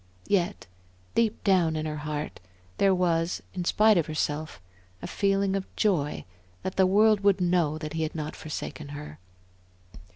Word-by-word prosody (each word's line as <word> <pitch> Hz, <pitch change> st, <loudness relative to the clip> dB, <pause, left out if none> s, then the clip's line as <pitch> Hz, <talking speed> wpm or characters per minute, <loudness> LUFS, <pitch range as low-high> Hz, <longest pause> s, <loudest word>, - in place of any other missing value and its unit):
Yet 195 Hz, 0 st, 0 dB, 0.5 s
deep 225 Hz, -2 st, +1 dB
down 180 Hz, -6 st, +3 dB
in 155 Hz, 0 st, -2 dB
her 155 Hz, -1 st, -3 dB
heart, 150 Hz, 0 st, -4 dB, 0.4 s
there 195 Hz, -1 st, +5 dB
was, 170 Hz, -1 st, 0 dB
in 180 Hz, -2 st, -3 dB
spite 215 Hz, 0 st, +5 dB
of 165 Hz, -, -1 dB
herself, 155 Hz, 0 st, -2 dB, 0.4 s
a -, -, -7 dB
feeling 195 Hz, -1 st, +1 dB
of 195 Hz, -1 st, -3 dB
joy 165 Hz, -9 st, 0 dB, 0.4 s
that 190 Hz, -, -3 dB
the 190 Hz, -1 st, +4 dB
world 210 Hz, +2 st, +5 dB
would 200 Hz, -1 st, +3 dB
know 175 Hz, -4 st, +2 dB
that 155 Hz, 0 st, -6 dB
he 160 Hz, -, -2 dB
had 155 Hz, 0 st, -2 dB
not 155 Hz, -1 st, -4 dB
forsaken 155 Hz, -1 st, -6 dB
her. 150 Hz, -7 st, -9 dB
175 Hz, 160 wpm, -27 LUFS, 155-195 Hz, 0.5 s, there